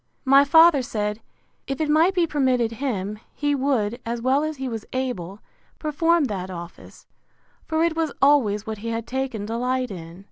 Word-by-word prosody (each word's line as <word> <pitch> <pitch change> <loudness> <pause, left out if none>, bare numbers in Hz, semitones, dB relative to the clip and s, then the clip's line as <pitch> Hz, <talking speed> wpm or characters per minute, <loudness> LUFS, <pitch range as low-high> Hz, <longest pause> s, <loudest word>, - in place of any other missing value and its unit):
My 275 +1 +7
father 320 0 +6
said, 210 -4 -3 0.5
If 270 -1 -3
it 310 - 0
might 320 +5 +3
be 350 -2 +3
permitted 255 -7 +1
him, 215 -5 -3 0.2
he 290 -1 0
would, 255 -5 0
as 235 +1 -3
well 260 +5 +2
as 310 -1 -3
he 265 0 -4
was 225 -3 -5
able, 210 -7 -4 0.4
perform 330 +2 +1
that 195 -7 -3
office; 175 -1 -10 0.6
for 320 0 +1
it 335 -1 +1
was 325 -2 0
always 245 -8 +3
what 220 -1 -5
he 230 - -7
had 230 0 -3
taken 260 -5 -3
delight 250 +3 -1
in. 170 -1 -9
255 Hz, 175 wpm, -23 LUFS, 215-290 Hz, 0.6 s, My